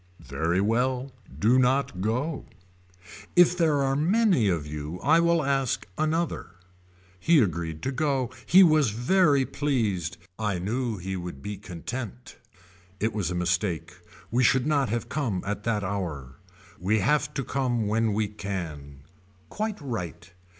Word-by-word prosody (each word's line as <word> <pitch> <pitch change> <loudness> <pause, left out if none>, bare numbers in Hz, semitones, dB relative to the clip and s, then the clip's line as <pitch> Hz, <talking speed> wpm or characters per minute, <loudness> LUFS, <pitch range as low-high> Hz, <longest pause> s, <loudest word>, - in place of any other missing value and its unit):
Very 85 +4 0
well 125 +5 0 0.3
do 120 +5 +4
not 130 -7 +1
go. 125 +9 -2 0.9
If 175 0 +6
there 155 -5 +2
are 135 0 +1
many 175 - +3
of 85 -5 -1
you 75 +3 -6
I 160 +5 +4
will 170 -1 +3
ask 135 -2 0
another. 155 - -1 0.6
He 165 - +4
agreed 80 - -1
to 130 - -1
go. 135 -2 0 0.2
He 190 +3 +8
was 155 -7 +4
very 140 - +3
pleased. 105 - -1 0.2
I 105 -4 0
knew 115 +5 -2
he 95 +1 -4
would 90 -7 -7
be 105 0 -4
content. 110 +5 -7 0.6
It 110 +2 0
was 100 -5 -1
a 90 - -3
mistake 90 -1 -1 0.4
we 125 +2 +2
should 130 +1 +3
not 145 -5 +1
have 115 +1 -2
come 120 -11 -2
at 105 +1 -4
that 110 -3 0
hour. 80 -10 -4 0.4
We 100 +5 +1
have 150 +8 +1
to 135 - -1
come 125 -4 -1
when 110 0 +1
we 110 0 +1
can. 80 -9 -6 0.5
Quite 215 -1 -3
right. 90 - -6
115 Hz, 145 wpm, -26 LUFS, 90-140 Hz, 0.9 s, He